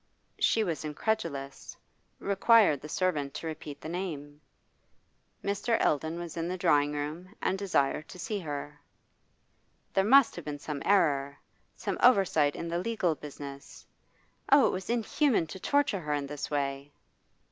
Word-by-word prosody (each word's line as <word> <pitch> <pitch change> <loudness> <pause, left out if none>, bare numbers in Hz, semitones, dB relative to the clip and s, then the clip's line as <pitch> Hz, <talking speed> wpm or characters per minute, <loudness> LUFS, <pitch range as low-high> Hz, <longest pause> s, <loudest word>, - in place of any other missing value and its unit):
She 225 - +3
was 170 -6 -3
incredulous, 150 -4 -3 0.4
required 200 - +4
the 150 - -9
servant 150 -6 -1
to 160 - -6
repeat 150 -2 -6
the - - -8
name. 155 -4 -5 1.0
Mr. 205 +3 0
Eldon 160 +3 +1
was 170 -2 -6
in 165 0 -2
the 185 +1 -3
drawing 150 -5 +3
room 155 +7 -5
and - - 0
desired 165 -6 0
to - - -11
see 210 +3 -3
her. 145 -3 -6 1.1
There 195 - +3
must 265 +5 +6
have 175 - -7
been 150 -1 -4
some 145 -1 -5
error, 140 -8 +2 0.4
some - - -4
oversight 190 - +4
in 170 - -5
the 170 +1 -1
legal 205 -4 0
business. 140 -2 -10 0.7
Oh, 280 0 +7
it - - +3
was 190 +2 -5
inhuman 240 - +2
to 160 +4 -9
torture 285 -1 +1
her 150 -3 -3
in 145 -1 -1
this 145 0 -5
way! 140 0 -2
165 Hz, 150 wpm, -29 LUFS, 145-195 Hz, 1.1 s, Oh